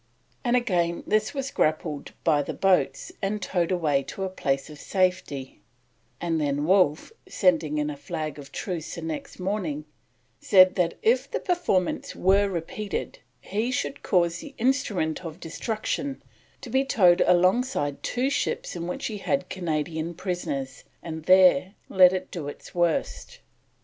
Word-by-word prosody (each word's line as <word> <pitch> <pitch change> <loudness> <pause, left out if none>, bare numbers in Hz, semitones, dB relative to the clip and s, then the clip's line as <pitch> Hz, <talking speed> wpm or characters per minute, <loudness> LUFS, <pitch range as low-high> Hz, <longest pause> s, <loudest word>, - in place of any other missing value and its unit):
and 245 -1 +2
again 175 -8 +1
this 215 0 +1
was 275 -1 -4
grappled 155 -1 -1
by 150 -3 +3
the 140 - -5
boats 180 -9 +1
and 200 +2 -1
towed 180 -3 -1
away 155 -6 +2
to 165 +8 -6
a 190 - -1
place 135 -7 -1
of 150 -2 -11
safety; 180 -9 -1 0.6
and 165 -2 -1
then 145 0 0
Wolfe, 180 - +3 0.2
sending 165 -5 +2
in 150 0 0
a - - -6
flag 155 +1 -5
of 140 -1 -11
truce 170 -5 -4
the 170 - -7
next 160 -2 -5
morning, 180 -6 -2 0.5
said 185 -2 +6
that 175 -3 0
if 460 +3 +3
the - - -2
performance 340 - 0
were 195 +2 +3
repeated 190 +4 -4 0.2
he 215 +5 -2
should 280 +1 -2
cause 175 -2 +1
the 285 -2 -10
instrument 210 - 0
of 165 0 -7
destruction 225 - -3 0.4
to - - -8
be 265 +1 +3
towed 185 -10 +4
alongside 180 - +2
two 260 +3 -1
ships 285 - -2
in 170 -1 -4
which 180 - -4
he 215 -2 -3
had 275 +7 -1
Canadian 160 -1 -3
prisoners, 140 -8 -4 0.2
and 160 -1 -6
there 185 0 +5
let 185 -1 +7
it 185 -1 -4
do 160 -5 -5
its 145 - -9
worst. 175 -2 -1
180 Hz, 155 wpm, -26 LUFS, 155-200 Hz, 0.6 s, let